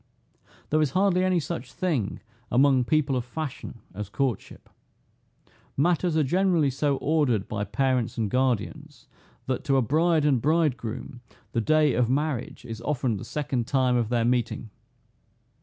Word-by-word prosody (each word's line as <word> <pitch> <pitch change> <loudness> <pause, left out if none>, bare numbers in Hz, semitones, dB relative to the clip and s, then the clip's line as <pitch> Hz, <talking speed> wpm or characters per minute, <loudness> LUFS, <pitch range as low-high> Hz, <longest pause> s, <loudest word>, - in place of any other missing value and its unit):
There 155 +1 +3
is 145 -3 0
hardly 185 -2 +3
any 185 -1 +2
such 130 -4 -5
thing 150 - -2 0.3
among 130 0 +4
people 145 -1 +1
of 125 - -1
fashion 130 -2 -6
as 100 0 -6
courtship. 125 -1 -3 1.1
Matters 170 +2 +2
are 155 - +4
generally 170 -1 +2
so 140 +1 0
ordered 140 -10 +1
by 105 -1 -3
parents 130 +2 0
and 110 -2 0
guardians, 130 +4 -2 0.4
that 130 -1 -2
to 135 -1 +3
a 130 - +3
bride 160 +4 +2
and 135 -5 +3
bridegroom, 130 -6 -1 0.3
the 115 - 0
day 155 +3 +3
of 120 0 +1
marriage 135 -3 -2
is 115 -1 -7
often 125 -4 -1
the - - -7
second 130 -5 -2
time 130 -2 +2
of 120 -3 0
their 120 -1 +1
meeting. 120 -2 -1
135 Hz, 150 wpm, -26 LUFS, 120-155 Hz, 1.1 s, among